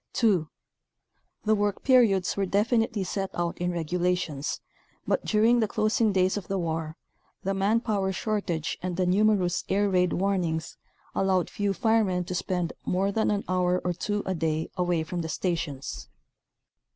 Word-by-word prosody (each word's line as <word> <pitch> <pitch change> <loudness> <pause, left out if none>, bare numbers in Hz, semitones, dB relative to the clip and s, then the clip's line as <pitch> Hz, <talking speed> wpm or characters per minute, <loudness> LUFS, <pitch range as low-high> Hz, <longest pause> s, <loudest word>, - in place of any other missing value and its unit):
(2) 190 -10 +2 1.0
The 215 - +4
work 205 -1 0
periods 225 -9 +4
were 195 -1 0
definitely 225 +2 +1
set 195 +1 -3
out 170 -1 -2
in 175 0 0
regulations, 175 -3 -1 0.5
but, - - +1
during 225 +3 +4
the 220 - +2
closing 215 +1 +1
days 185 0 +2
of 195 - -6
the 195 - -1
war, 160 -2 -3 0.5
the 195 - 0
man 200 +4 +2
power 200 -5 0
shortage 190 -5 -2
and 180 -1 -3
the 185 - +2
nu 185 +4 +3
merous 185 -5 +2
air 205 +1 +2
raid 180 -1 +2
warnings 175 -5 -1 0.4
allowed 190 -2 +1
few 205 -1 0
firemen 210 -4 +2
to 180 - -5
spend 180 -1 -2
more 195 +2 0
than 220 +2 +1
an 205 -1 0
hour 180 0 +1
or 180 - +1
two 205 +4 -2
a 190 - -1
day 160 -2 -1
away 175 -2 +1
from 175 +2 -4
the 160 - -4
stations. 140 - -3
185 Hz, 165 wpm, -27 LUFS, 175-205 Hz, 1.0 s, The